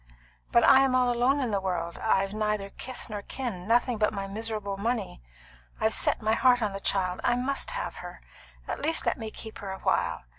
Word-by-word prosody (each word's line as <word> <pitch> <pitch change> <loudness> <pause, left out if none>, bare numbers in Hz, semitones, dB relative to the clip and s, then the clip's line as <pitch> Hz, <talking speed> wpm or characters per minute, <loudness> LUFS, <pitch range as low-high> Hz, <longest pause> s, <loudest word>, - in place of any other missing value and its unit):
But 235 - +5
I'm 265 -1 +6
all 250 -1 +3
alone 250 +4 +2
in 245 -4 -1
the 200 -1 0
world; 180 -3 -3
I've 195 -2 +1
neither 210 -2 -1
kith 255 -1 -8
nor 210 -2 -5
kin; 205 -6 -5
nothing 240 0 +2
but 210 - +3
my 200 -2 -4
miserable 210 0 -3
money. 210 - -2 0.6
I've 220 0 +2
set - - +2
my 220 +1 +2
heart 245 +1 +4
on 205 -2 -1
the 195 - -4
child; 185 -2 0
I 240 - +3
must 265 +3 -1
have - - -4
her. - - -9 0.5
At - - -4
least 320 +2 +2
let - - 0
me 220 -1 -4
keep 220 0 -9
her 200 - -6
a 190 - -5
while. - - 0
220 Hz, 210 wpm, -28 LUFS, 195-245 Hz, 0.6 s, I'm